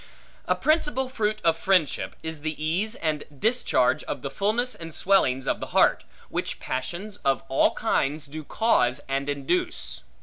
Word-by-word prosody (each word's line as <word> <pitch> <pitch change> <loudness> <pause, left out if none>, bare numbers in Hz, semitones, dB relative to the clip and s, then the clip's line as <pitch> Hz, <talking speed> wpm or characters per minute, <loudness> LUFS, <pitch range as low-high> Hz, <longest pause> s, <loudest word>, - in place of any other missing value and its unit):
A - - +3
principal 295 -4 +1
fruit 215 -4 -1
of 165 -1 +4
friendship, 175 -4 +1
is 160 -2 -5
the 155 0 -3
ease 180 +9 -1
and 155 -2 -1
discharge 150 - +2
of - - -5
the 140 - -3
fulness 220 - 0
and 165 -1 -8
swellings 135 -10 +3
of - - 0
the - - -5
heart, - - +4 0.2
which - - -3
passions 175 +11 -4
of 135 -8 0
all 135 - +3
kinds 145 +2 0
do 155 +2 -7
cause 140 - +2
and 135 +1 -1
induce. 145 +5 -2
160 Hz, 160 wpm, -26 LUFS, 140-210 Hz, 0.2 s, of